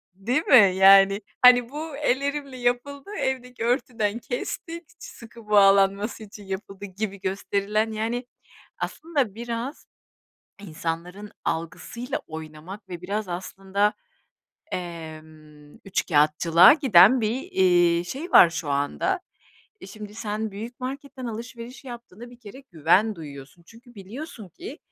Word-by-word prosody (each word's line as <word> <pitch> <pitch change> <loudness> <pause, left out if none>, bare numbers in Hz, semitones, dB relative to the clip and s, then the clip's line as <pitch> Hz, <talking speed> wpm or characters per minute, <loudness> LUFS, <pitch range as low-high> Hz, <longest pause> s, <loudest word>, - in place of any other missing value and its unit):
Değil 245 - -1
mi? 200 -8 +7
Yani, 195 +1 +6 0.2
hani, 245 -1 +7
"Bu 300 +1 -6
ellerimle 280 -1 -1
yapıldı, 250 +6 -2
evdeki 250 -3 -3
örtüden 235 -3 -1
kestik 335 - -6
ç - - -18
sıkı 230 -2 -13
bağlanması 200 +2 +4
için 205 0 -12
yapıldı" 195 +1 -7
gibi 200 +1 -5
gösterilen, 200 +3 -1
yani, 230 +3 -3 0.5
aslında 280 -11 -2
biraz 235 +4 -5 0.7
insanların 175 +3 -6
algısıyla 235 - -4
oynamak 160 +5 -9
ve 175 -1 -7
biraz 205 +2 -3
aslında, 195 +3 -1 0.8
emm, 155 -3 -9
üçkâğıtçılığa 165 - +5
giden 255 - +6
bir, 230 +5 -1
eee, 175 -2 +3
şey 285 - -7
var 170 - +8
şu 170 -3 -5
anda. 145 - -1 0.6
E, - - -10
şimdi 210 +1 -10
sen 215 0 -4
büyük 225 +5 -8
marketten 265 0 -6
alışveriş 235 +3 -8
yaptığına 240 -2 -10
bir 245 - -16
kere 235 +4 -12
güven 180 +7 +2
duyuyorsun. 145 +1 -11
Çünkü 240 +1 -18
biliyorsun 220 - -9
ki 355 - -10
210 Hz, 120 wpm, -24 LUFS, 185-245 Hz, 0.8 s, var